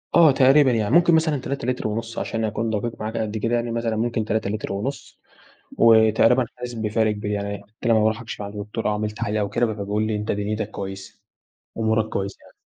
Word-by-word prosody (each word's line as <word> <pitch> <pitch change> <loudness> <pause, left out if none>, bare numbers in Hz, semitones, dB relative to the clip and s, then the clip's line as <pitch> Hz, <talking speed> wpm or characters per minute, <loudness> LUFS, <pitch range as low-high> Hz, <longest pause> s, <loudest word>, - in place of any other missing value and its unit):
آه 165 -4 +7
تقريبًا. 135 +1 +5
يعني 110 +3 +1
ممكن 170 -1 +6
مثلًا 160 -2 +2
3 140 -1 -4
لِتْر 125 -3 -1
ونُص 115 +2 -4
عشان 115 -1 -3
أكون 110 +2 -2
دَقيق 110 +2 -3
معاك 110 +2 -3
قد 110 -1 -2
كده 115 +3 0
يعني 120 0 -1
مثلًا 115 -1 -1
ممكن 115 0 -1
3 110 -1 -1
لِتْر 105 -1 -3
ونُص، 125 +8 -5 0.6
وتقريبًا 115 +2 +5
حاسِس 125 0 -6
بفَرْق 110 -1 0
كبير، 105 0 -4
يعني 100 0 -3
حتّى 110 +4 -6
لمّا 115 -1 +5
باروح 110 +1 +1
أكشف 110 -2 -7
عند 100 +1 -7
دكتور 105 +2 -5
أو - - +2
أعمل 105 0 -2
تحاليل 105 0 -3
أو 100 -1 -1
كده، 120 +3 +1
فبيقول 105 +1 -2
لي: 110 - -1
"أنت 105 +1 -2
دنْيتك 105 +1 -2
كويسة،" 95 -1 -7 0.6
أمورك 110 0 +1
كويسة 100 -2 -3
يعني. - - -20
110 Hz, 210 wpm, -23 LUFS, 105-120 Hz, 0.6 s, آه